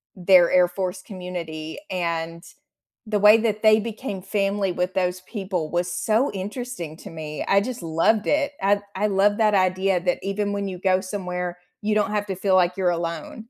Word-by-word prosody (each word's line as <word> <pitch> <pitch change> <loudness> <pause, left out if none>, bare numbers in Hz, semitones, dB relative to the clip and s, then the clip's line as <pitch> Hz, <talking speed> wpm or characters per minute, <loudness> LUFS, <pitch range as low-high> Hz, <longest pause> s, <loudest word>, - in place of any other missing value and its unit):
their 180 -1 +5
Air 180 -1 +5
Force 185 0 -4
community, 170 -5 -6
and 170 -1 -3 0.7
the 210 -2 +1
way 210 +2 +8
that 215 -1 -1
they 215 0 +6
became 215 -3 -5
family 195 -1 0
with 180 +1 -2
those 180 -1 -1
people 185 -6 -4
was 175 +1 0
so 220 +8 +1
interesting 195 - -6
to - - -10
me, 155 -2 -6
I 200 0 +4
just 245 -2 -5
loved 165 +7 +1
it, 295 -1 +1
I 200 +1 +2 0.2
I 210 +2 +1
love 205 +1 +2
that 215 -2 +3
idea 185 -1 +2
that 180 -1 0
even 200 +1 -2
when 200 -1 -2
you 185 -1 -5
go 185 0 +2
somewhere, 180 -2 -4 0.2
you 210 0 0
don't 210 0 +1
have 205 -1 -1
to 190 - -3
feel 190 0 +1
like 180 -1 +3
you're 185 -2 +1
alone. 170 -2 -3
190 Hz, 185 wpm, -23 LUFS, 180-205 Hz, 0.7 s, way